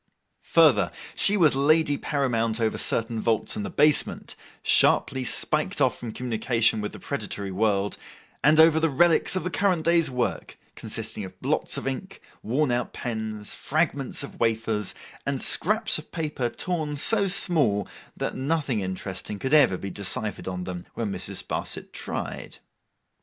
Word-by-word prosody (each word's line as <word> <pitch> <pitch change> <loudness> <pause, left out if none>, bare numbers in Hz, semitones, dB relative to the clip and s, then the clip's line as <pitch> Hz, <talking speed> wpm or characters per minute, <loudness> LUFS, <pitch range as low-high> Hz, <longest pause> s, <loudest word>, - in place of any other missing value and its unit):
Further, - - +5 0.2
she 205 +1 +3
was 155 -7 +4
lady 145 +1 +3
paramount 120 -6 -1
over 110 -1 0
certain 115 -1 -1
vaults 110 -2 +1
in - - -3
the 100 - -4
basement, 150 0 +3 0.3
sharply 130 -2 +3
spiked 125 - +1
off - - +2
from 120 -2 -6
communication 115 -2 0
with 105 - -5
the - - -9
predatory 100 -1 -4
world; 100 0 0 0.4
and 150 +3 +5
over 160 0 +6
the 165 0 +2
relics 165 +5 +3
of 185 - -1
the 180 - -3
current 180 -5 +1
day's 165 -2 +3
work, 125 -2 -3 0.2
consisting 105 - -3
of 95 - -10
blots - - +1
of - - -5
ink, 135 +9 -5 0.2
worn 130 +4 0
out 120 0 -2
pens, 110 -3 -4
fragments 145 -3 -1
of - - -10
wafers, 110 -2 0 0.3
and 140 -1 -2
scraps 215 - +2
of 155 - -13
paper 150 -7 -2
torn 155 -1 -3
so 200 +7 +3
small, 145 - +2 0.3
that - - -3
nothing 140 -4 -1
interesting 95 +1 -5
could 130 +7 -3
ever 135 -11 +5
be 100 +1 -6
deciphered 105 +1 -3
on 90 -1 -4
them 90 -1 -7
when 110 -4 -3
Mrs. - - -1
Sparsit - - -3
tried. - - -5
125 Hz, 155 wpm, -25 LUFS, 110-155 Hz, 0.4 s, over